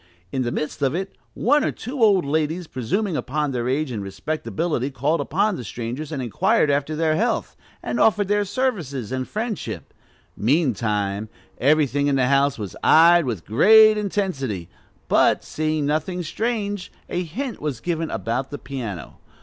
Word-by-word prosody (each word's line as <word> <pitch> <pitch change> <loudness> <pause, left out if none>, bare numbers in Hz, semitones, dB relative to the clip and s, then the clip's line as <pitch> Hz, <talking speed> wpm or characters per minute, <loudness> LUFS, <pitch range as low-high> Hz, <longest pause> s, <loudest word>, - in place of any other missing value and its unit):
In 130 - -1
the 120 -1 -1
midst 150 +2 -4
of 135 +1 +1
it, 190 +2 -4 0.2
one 290 +5 +3
or - - +1
two 255 +3 -6
old 200 -7 +5
ladies, 160 +4 -1
presuming 160 - -2
upon 150 +1 -1
their 125 -1 -2
age 140 +1 0
and 110 -4 -3
respectability, 155 - -2
called 140 +5 0
upon 210 -3 0
the - - -6
strangers 120 +8 -5
and 140 -4 -3
inquired 120 +5 +2
after 145 +2 0
their 155 0 +1
health, - - -1 0.3
and 120 0 -2
offered 210 +1 +3
their 205 +1 +2
services 180 - -2
and 130 -1 -2
friendship; 210 - -4 0.4
meantime, 110 - 0 0.3
everything 145 0 +3
in 140 - +2
the 130 -2 +3
house 140 0 +3
was 105 -4 -6
eyed 170 +1 +6
with 110 -9 -4
great 215 - +7
intensity, 170 - -2 0.4
but, - - +3
seeing 155 -1 -1
nothing 160 +5 -1
strange, 205 +1 -3 0.2
a 175 - -2
hint 230 - -5
was 145 -6 -3
given 165 0 -2
about 125 +4 -2
the 145 - -5
piano. 115 - -7
150 Hz, 160 wpm, -23 LUFS, 125-180 Hz, 0.4 s, great